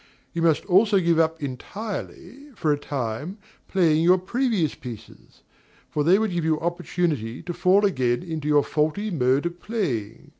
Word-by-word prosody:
You 170 - -2
must 165 -2 +2
also 200 +2 +4
give 170 -2 +2
up 160 -1 +1
entirely, 210 - -6
for 155 -6 0
a 145 - -3
time, 140 - -4 0.3
playing 165 -5 +3
your 180 +2 +5
previous 200 - 0
pieces; 115 -4 -11 0.5
for 150 - 0
they 175 +5 +5
would 220 -1 0
give 175 -2 -1
you 160 -1 +1
opportunity 170 -8 -2
to 175 +1 -4
fall 190 +4 +3
again 130 -8 +1
into 160 -4 -5
your 145 -1 +4
faulty 155 +8 -1
mode 135 -2 +1
of 175 0 -4
playing. 130 - -3
165 Hz, 160 wpm, -24 LUFS, 145-185 Hz, 0.5 s, your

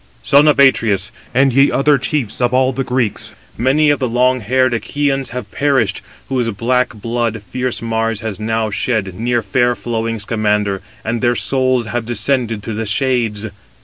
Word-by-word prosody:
"Son 145 +2 +5
of 150 - +4
Atreus, 110 -7 +3 0.2
and 135 +1 +3
ye 135 +2 +5
other 140 0 +3
chiefs 130 -5 -2
of 120 +1 +2
all 130 0 +2
the 135 +2 -2
Greeks, 125 -4 -2 0.2
many 145 +6 +3
of 145 - 0
the 130 - 0
long 125 +2 +2
haired 130 +3 +1
Achæans 135 +3 -1
have 125 0 -7
perished, 130 -8 +1 0.3
whose 125 -3 -1
black 120 +3 0
blood 115 0 -2
fierce 125 -2 -2
Mars 115 -1 -1
has 110 -3 -5
now 110 0 -1
shed 105 -4 -1
near 120 +4 -1
fair 125 -2 +1
flowing 115 -1 -3
Scamander, 105 -2 0 0.2
and 115 +1 -2
their 120 -1 +2
souls 130 -1 +1
have 115 +1 -3
descended 120 -3 0
to 110 - -4
the 110 +1 -3
shades! 115 -2 0
120 Hz, 170 wpm, -17 LUFS, 110-130 Hz, 0.3 s, Son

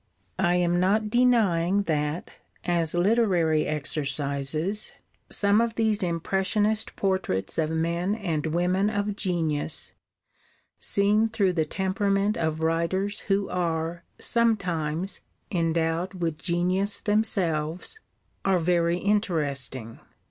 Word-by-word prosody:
I 175 -2 +3
am 175 0 +2
not 210 +4 +2
denying 205 -7 +3
that, 150 -1 -2 0.3
as 170 -2 +1
literary 175 -5 +2
exercises, 150 +5 -1 0.4
some 205 +2 +3
of 230 -1 -1
these 220 -2 +1
impressionist 195 +5 0
portraits 190 - -1
of 155 -1 +1
men 170 +4 0
and 165 -8 -2
women 180 +5 +1
of 205 -1 -2
genius, 165 -6 -1 0.9
seen 210 +3 +2
through 200 -5 +1
the 160 -3 +1
temperament 195 +4 0
of 160 -1 -1
writers 185 +6 0
who 195 0 +2
are, 170 -1 -2
sometimes, 185 -7 0 0.3
endowed 165 +1 0
with 165 -3 -2
genius 185 +3 0
themselves, 185 - 0 0.4
are 195 -1 +3
very 170 0 +2
interesting. 145 - -1
180 Hz, 105 wpm, -26 LUFS, 160-200 Hz, 0.9 s, I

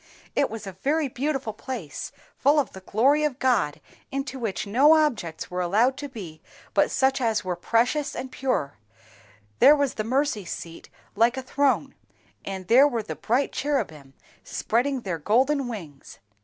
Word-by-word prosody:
"It - - +2
was 225 -1 -7
a 195 - -5
very 285 - 0
beautiful 265 -3 -2
place, 210 - -6 0.2
full 290 +3 +3
of 280 - -2
the 190 - -8
glory 260 +10 +2
of 295 -4 0
God, 205 - +1 0.3
into 270 -1 -4
which 220 -4 -3
no 270 +10 +5
objects 230 - -1
were 180 0 -2
allowed 220 +9 +2
to 285 - -6
be 175 -11 -9 0.3
but - - +3
such 265 0 +1
as 220 -4 0
were 180 -1 -1
precious 240 - 0
and 260 - -5
pure; 250 - -2 0.8
there 295 - +8
was 285 -3 0
the 215 - -3
mercy 255 -2 0
seat 165 -1 -8 0.3
like 235 +4 +3
a 265 - -3
throne, 280 +1 +1 0.5
and 190 -2 -6
there 265 +5 +7
were 235 -6 -2
the - - -6
bright 250 +5 0
cherubim 160 - -3 0.3
spreading 255 +3 -1
their 180 -6 -3
golden 260 - +2
wings. 165 - -9
240 Hz, 165 wpm, -25 LUFS, 195-275 Hz, 0.8 s, there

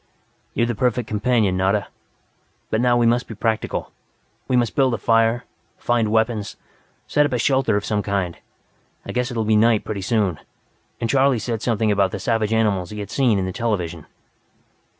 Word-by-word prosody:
"You're 115 - +2
the 120 - -1
perfect 125 0 0
companion, 110 -3 +1
Nada.... 95 +1 0 0.8
But 110 - +1
now 120 -1 +3
we 120 - +3
must 120 +2 +2
be 110 - -8
practical. 110 +1 -2 0.6
We 130 - +1
must 120 -2 +1
build 130 -3 +3
a - - -4
fire, 115 +3 +2 0.3
find 115 -3 0
weapons, 110 -1 0 0.5
set 150 - +2
up 145 - -1
a - - +1
shelter 130 -3 +2
of 105 - -3
some 105 -1 0
kind. 100 -4 -2 0.7
I - - -5
guess 125 +1 -1
it 120 - -5
will 110 - 0
be 110 0 +3
night, 110 0 +3
pretty 100 -2 -4
soon. 95 -5 0 0.6
And 115 - -1
Charley 135 +1 +3
said 115 0 -3
something 110 -2 +1
about 100 -2 +1
savage 115 -3 0
animals 105 -5 +1
he 105 - -7
had 100 -1 -6
seen 125 -6 +2
in 95 - -1
the 95 - -3
television. 90 -9 -3
110 Hz, 185 wpm, -21 LUFS, 105-120 Hz, 0.8 s, now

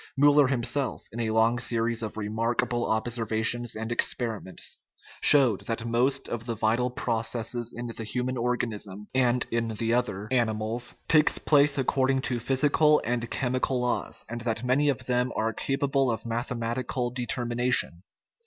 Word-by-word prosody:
Miiller 145 0 +6
himself, 135 +1 0
in 115 - -7
a 115 -1 -1
long 110 +2 +2
series 115 -1 0
of 110 -1 -5
remarkable 115 +3 -1
observations 115 +1 0
and 110 +1 -5
experiments, 115 -5 -2 0.4
showed 130 -9 +5
that 115 0 -2
most 125 +4 +1
of 120 0 -5
the 115 - -2
vital 115 +3 +1
processes 120 -1 -1
in 120 - -6
the 115 -1 -5
human 125 +4 -2
organism 110 -5 -3
(and 125 -1 +2
in 115 0 0
the 115 +2 0
other 115 -5 -1
animals) 115 0 0
take 155 -1 +5 0.2
place 145 -1 +4
ac 135 - +2
cording 135 0 +1
to 125 -2 -1
physical 145 +4 +3
and 120 0 -2
chemical 130 0 0
laws, 125 0 -1
and 120 +1 -6
that 115 0 -2
many 135 +4 +2
of 135 - -2
them 125 0 0
are 110 +1 0
capable 135 +1 0
of 115 0 -3
mathematical 120 +1 -2
determination. 120 -5 -1
120 Hz, 150 wpm, -27 LUFS, 115-125 Hz, 0.4 s, Miiller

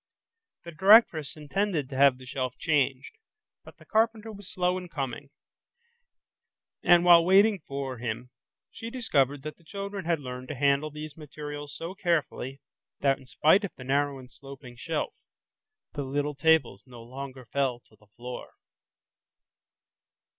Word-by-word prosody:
The 170 - -8
directress 180 -4 +5
intended 155 0 -1
to 135 - -7
have 135 -1 +5
the 130 - -13
shelf 130 -1 -4
changed, 140 - 0 0.4
but - - -15
the - - -18
carpenter 225 0 +1
was 200 -3 -9
slow 180 0 +1
in 180 -1 -10
coming, 140 -2 -5 1.5
and 175 0 +5
while 170 -1 +8
waiting 195 +3 +5
for 135 -3 -4
him 120 +1 -4 0.4
she 225 - -7
discovered 145 - 0
that 155 0 -7
the 170 - -24
children 200 +2 -6
had 170 -2 +1
learned 125 -2 -7
to 145 - -5
handle 140 +2 +2
these 150 0 -8
materials 145 -1 -8
so 170 +3 -6
carefully 155 -7 -2 0.4
that 135 -1 +2
in 130 - -17
spite 160 +10 +4
of 200 - -5
the 125 - -10
narrow 140 +1 0
and 125 -2 -13
sloping 135 -1 -12
shelf, 155 +6 -3 0.8
the 145 - -3
little 145 +2 -2
tables 140 -9 +2
no 120 -2 -12
longer 130 +1 -8
fell 130 -1 -1
to 110 - -25
the 105 0 -25
floor. 120 +4 -9
145 Hz, 150 wpm, -28 LUFS, 130-170 Hz, 1.5 s, while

